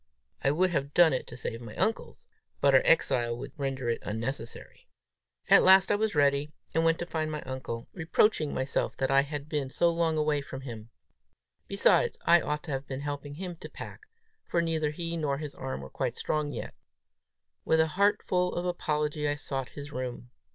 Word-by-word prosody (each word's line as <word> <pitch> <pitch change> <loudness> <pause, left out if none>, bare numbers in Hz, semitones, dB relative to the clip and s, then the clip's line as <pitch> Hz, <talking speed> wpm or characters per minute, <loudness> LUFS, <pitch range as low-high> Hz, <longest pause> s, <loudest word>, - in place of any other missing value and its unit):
I - - +4
would 180 +6 +2
have 140 -3 -2
done 170 -4 +6
it 130 - -2
to - - -9
save 115 -1 -4
my 110 -2 -9
uncle's, 225 - -2 0.3
but 140 -1 +4
our 130 - +7
exile 120 -7 +2
would 135 +2 -7
render 135 -3 -3
it 115 - -1
unnecessary! 115 +3 -6 0.6
At - - +8
last 190 +1 +6
I - - +4
was 215 -2 0
ready, 145 0 +2 0.2
and 160 - +2
went 165 0 +3
to 175 - -4
find 155 -2 -2
my 150 -1 -4
uncle, 130 -3 -5
reproaching 160 -1 +2
myself 130 +1 -1
that 135 0 0
I 135 0 +6
had 145 0 -5
been 150 -4 -2
so 170 +5 +2
long 165 -1 +1
away 150 -1 +1
from 135 -1 -8
him. 115 -4 -8 0.8
Besides, - - +3
I 170 0 +6
ought 150 0 -2
to 165 - -6
have 135 +1 -3
been 135 0 -5
helping 145 0 -5
him 175 0 -6
to - - -9
pack, - - -10 0.4
for 170 - +1
neither 160 -2 0
he 165 +2 -4
nor 145 -3 0
his 150 -1 -6
arm 65 +1 -5
was 65 - -10
quite - - -2
strong 150 -1 -1
yet. - - -6 0.9
With 160 - +2
a 160 0 +3
heartful 190 -2 +2
of 175 - -2
apology, 150 -4 -1
I 145 - 0
sought 135 -3 -4
his 145 0 -9
room. 125 -2 -5
150 Hz, 195 wpm, -29 LUFS, 135-165 Hz, 0.9 s, At